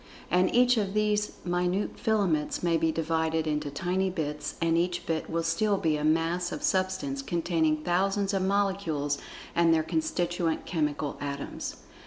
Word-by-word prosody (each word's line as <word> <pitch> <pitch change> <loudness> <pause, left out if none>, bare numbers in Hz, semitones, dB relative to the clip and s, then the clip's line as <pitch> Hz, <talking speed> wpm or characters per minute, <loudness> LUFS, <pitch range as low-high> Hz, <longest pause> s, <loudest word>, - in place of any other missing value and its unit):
And 180 +1 +3
each 250 0 +5
of 200 -2 -1
these 210 0 +1
minute 180 +2 0
filaments 190 -11 +1
may 170 -1 +2
be 160 0 +2
divided 160 0 0
into 150 -1 -1
tiny 185 +6 0
bits, 150 -4 -3
and 165 0 +2
each 175 +1 0
bit 160 -1 -2
will 165 0 -1
still 195 +5 +1
be 160 -4 +1
a 150 - -3
Mass 165 +3 +1
of 295 - -5
Substance 190 +3 0
containing 165 - 0
thousands 195 +3 +1
of 195 - +1
molecules 190 -7 0 0.3
and 170 -1 +4
their 160 -1 +3
constituent 175 - -1
chemical 150 -3 -1
atoms. 140 -1 -4
175 Hz, 155 wpm, -28 LUFS, 160-195 Hz, 0.3 s, each